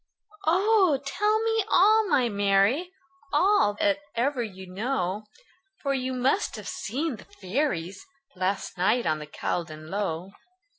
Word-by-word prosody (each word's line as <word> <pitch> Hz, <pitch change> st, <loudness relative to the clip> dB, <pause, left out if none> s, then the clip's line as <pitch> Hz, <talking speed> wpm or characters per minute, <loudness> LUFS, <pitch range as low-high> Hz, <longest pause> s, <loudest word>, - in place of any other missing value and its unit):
"Oh! 375 Hz, -3 st, +4 dB
tell 420 Hz, +9 st, +1 dB
me 450 Hz, -1 st, +1 dB
all, 430 Hz, +3 st, +5 dB
my 280 Hz, -8 st, +3 dB
Mary 205 Hz, -, +2 dB, 0.4 s
All, 405 Hz, +2 st, +4 dB
all 205 Hz, -, +2 dB
that 200 Hz, -1 st, +1 dB, 0.2 s
ever 255 Hz, +2 st, 0 dB
you 190 Hz, -4 st, -6 dB
know; 200 Hz, 0 st, -2 dB, 0.6 s
For 275 Hz, -1 st, +1 dB
you 260 Hz, -1 st, -2 dB
must 260 Hz, +10 st, +1 dB
have -, -, -8 dB
seen 270 Hz, +4 st, -3 dB
the -, -, -14 dB
fairies, 195 Hz, -, -3 dB, 0.3 s
Last 185 Hz, 0 st, -2 dB
night 220 Hz, +7 st, +2 dB
on 155 Hz, -1 st, +1 dB
the 150 Hz, -, -8 dB
Caldon 155 Hz, 0 st, -4 dB
Low." 190 Hz, -2 st, -3 dB
235 Hz, 140 wpm, -26 LUFS, 190-315 Hz, 0.6 s, all